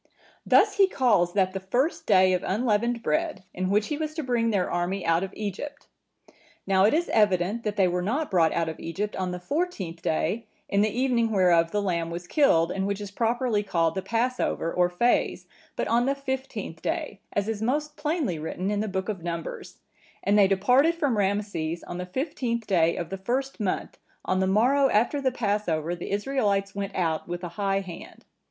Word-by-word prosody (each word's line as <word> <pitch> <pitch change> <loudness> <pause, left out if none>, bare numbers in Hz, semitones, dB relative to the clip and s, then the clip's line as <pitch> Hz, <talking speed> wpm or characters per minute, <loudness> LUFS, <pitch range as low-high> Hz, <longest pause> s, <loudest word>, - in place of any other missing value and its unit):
"Thus - - +4
he 395 -1 +6
calls 210 - +2
that 190 -2 +2
the 195 - -3
first 245 - -1
day 185 -2 +5
of 180 - +1
unleavened 235 +2 0
bread, 310 - -1
in 185 +1 -2
which 210 +2 +1
he 300 -1 -2
was 310 -1 -3
to 315 - -3
bring 240 -3 +1
their 195 -5 +1
army 175 +2 -2
out 165 +1 +3
of 190 - -4
Egypt. 215 +8 -5 0.8
Now 190 0 +4
it 215 - +4
is 345 +2 +1
evident, 205 +1 +2
that 210 -1 -1
they 195 -3 +3
were 180 0 -1
not 265 - -1
brought 165 -4 +4
out 170 -1 0
of 160 - -5
Egypt 200 +5 -4
on 185 -1 -2
the 180 0 -4
fourteenth 190 - -3
day, 205 +9 -1 0.2
in 200 - +2
the 215 - +3
evening 240 0 +1
whereof 175 -5 +3
the 205 +2 -1
lamb 170 -3 -1
was 170 +1 -6
killed, 175 - +3
and 195 0 -1
which 200 0 -2
is 205 -1 -7
properly 230 0 0
called 170 -5 0
the 190 - -2
Passover 230 -4 -1
or 180 0 +3
Phase, 235 +8 +1 0.3
but - - -2
on 240 +2 +2
the 275 - +1
fifteenth 265 - -5
day, 315 - -3
as 205 0 0
is 220 -2 -3
most 295 +6 -1
plainly 300 - -1
written 180 +5 -3
in 205 - 0
the 215 - -1
book 190 -1 -3
of 205 -5 -3
Numbers:(958) 170 -1 -6 0.4
'and 200 +2 +2
they 200 - +6
departed 250 - +3
from 290 -7 0
Rameses 195 -5 -1
on 175 - -6
the 180 - -5
fifteenth 235 - -2
day 170 -4 +2
of 170 0 -4
the 195 - -3
first 260 +7 -2
month, 205 -4 -3 0.3
on 185 - +1
the 190 - +2
morrow 260 +8 +3
after 245 +7 +2
the 260 -1 +1
Passover 200 -8 -1
the 175 - -7
Israelites 205 -3 0
went 200 -1 -4
out 165 -3 -1
with 175 +1 -5
an 175 - -5
high 195 +1 0
hand. 180 -3 -10
205 Hz, 200 wpm, -26 LUFS, 180-245 Hz, 0.8 s, he